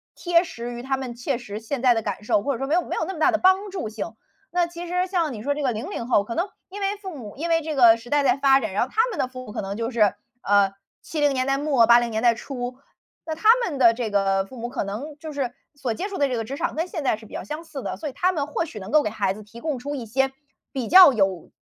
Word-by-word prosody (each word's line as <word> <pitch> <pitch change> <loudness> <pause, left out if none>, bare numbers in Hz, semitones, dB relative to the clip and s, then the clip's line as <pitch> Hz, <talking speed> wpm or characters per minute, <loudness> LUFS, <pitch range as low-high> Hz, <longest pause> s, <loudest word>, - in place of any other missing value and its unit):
贴 350 -1 -5
贴 335 - +7
实 240 -6 -6
于 240 - -6
他 270 +1 -1
们 260 -2 -5
切 245 +1 -2
实 215 -4 -7
现 245 +3 -4
在 250 -2 +5
的 225 - -1
感 205 -1 -4
受， 210 - +2
或 280 - 0
者 235 - -5
说 270 - -2
没 290 - -1
有 355 - +3
没 - - -5
有 - - -1
那 - - -3
么 325 - -8
大 320 - +5
的 325 - +2
帮 380 +3 +3
助 370 - -4
性。 220 +1 -6 0.4
那 350 -1 +2
其 345 0 -8
实 360 +1 0
像 340 -6 0
你 215 -2 -7
说 285 +2 +1
这 295 - -4
个 260 -4 +1
00 230 +1 -5
后 210 -5 +3
可 230 - -6
能 345 - 0 0.2
因 395 +2 -8
为 395 0 0
父 380 -3 -6
母 230 -8 -9
因 330 +5 -3
为 330 0 +3
这 310 -1 -4
个 235 -4 +7
时 230 +1 -13
代 290 -1 +3
在 255 0 +3
发 275 -1 +4
展， 215 - -3
然 195 - 0
后 - - -14
他 445 - +2
们 425 -10 -5
的 255 - +1
父 255 0 -9
母 210 - -9
可 - - -3
能 195 0 -4
就 230 +2 -3
是， 215 -4 +3 0.3
呃， 200 -1 +4 0.3
70 295 -3 0
年 255 -1 0
代 275 0 +1
末 280 -5 +3
80 240 0 +6
年 220 +1 -2
代 240 -1 +6
初。 250 -1 -6 0.5
那 315 - -3
他 430 +7 +2 0.2
们 300 -6 -3
的 235 -3 +6
这 230 -2 -3
个 195 -1 +1
父 225 - -13
母 240 0 -5
可 250 -4 -3
能 270 +10 -6
就 315 -1 -7
是 270 -4 -2 0.2
所 270 -5 -3
接 370 - -4
触 400 -2 -6
的 285 -1 +2
这 250 - -1
个 225 - -3
职 265 +5 -5
场 335 +4 -2
跟 330 +4 -2
现 335 -5 -5
在 250 -5 +1
是 220 - -14
比 - - -15
较 - - -4
相 305 +3 -6
似 295 -4 -7
的， - - -4
所 315 - -5
以 280 - -6
他 365 +7 +2
们 290 -5 -2
或 305 - -1
许 290 -10 -8
能 190 0 -8
够 305 0 +5
给 215 - -1
孩 205 -3 -1
子 210 +2 -11
提 220 +3 -13
供 300 0 -2
出 280 +4 -5
一 260 -5 -5
些 265 +4 +1 0.4
比 255 -5 -3
较 365 -4 +9
有， 195 -7 0
265 Hz, 325 characters per minute, -24 LUFS, 230-315 Hz, 0.5 s, 较